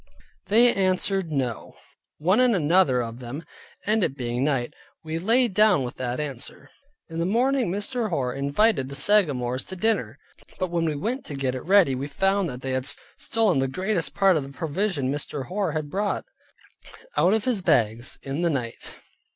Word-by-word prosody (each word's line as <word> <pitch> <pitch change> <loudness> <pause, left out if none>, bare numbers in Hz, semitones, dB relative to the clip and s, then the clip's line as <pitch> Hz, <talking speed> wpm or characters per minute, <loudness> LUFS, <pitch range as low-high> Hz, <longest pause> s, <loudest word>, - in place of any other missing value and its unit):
They 235 +3 +5
answered 190 -2 +1
no, 130 -6 -3 0.4
one 185 +9 +2
and 250 -3 +4
another 150 -6 +3
of 115 +1 -7
them, 130 +6 -7 0.4
and 215 0 +2
it 140 -5 -1
being 120 0 -2
night, 135 -4 0 0.3
we 160 +1 -3
lay 235 +7 +3
down 205 - +3
with 120 - -6
that 125 0 -3
answer. 140 -4 -6 0.4
In 165 -1 -6
the 170 - 0
morning 250 +2 +1
Mr. 215 +4 -2
Hoar 130 -8 -1
invited 140 +2 +1
the 140 - -5
Sagamores 135 -8 +2
to 190 - -6
dinner; 220 +4 0 0.4
but 185 -2 -2
when 170 -1 0
we 155 -2 -1
went 235 - -3
to 145 - -6
get 135 -2 -1
it 130 - -6
ready 190 -8 +5
we 130 +2 -3
found 195 +4 +1
that 125 -1 -7
they 135 - -3
had 130 +1 +1 0.3
stolen 215 - +1
the 135 - +1
greatest 185 +4 -1
part 195 -3 +4
of - - 0
the 135 - -9
provision 155 -1 -2
Mr. 145 -1 -4
Hoar 190 -3 -1
had 155 -1 -2
brought, 205 +1 -1 0.9
out 190 +4 +4
of 220 - -2
his 240 -6 0
bags, 120 -8 +1
in 140 +4 -3
the 175 - +2
night. 125 -6 -4
165 Hz, 185 wpm, -25 LUFS, 135-200 Hz, 0.9 s, They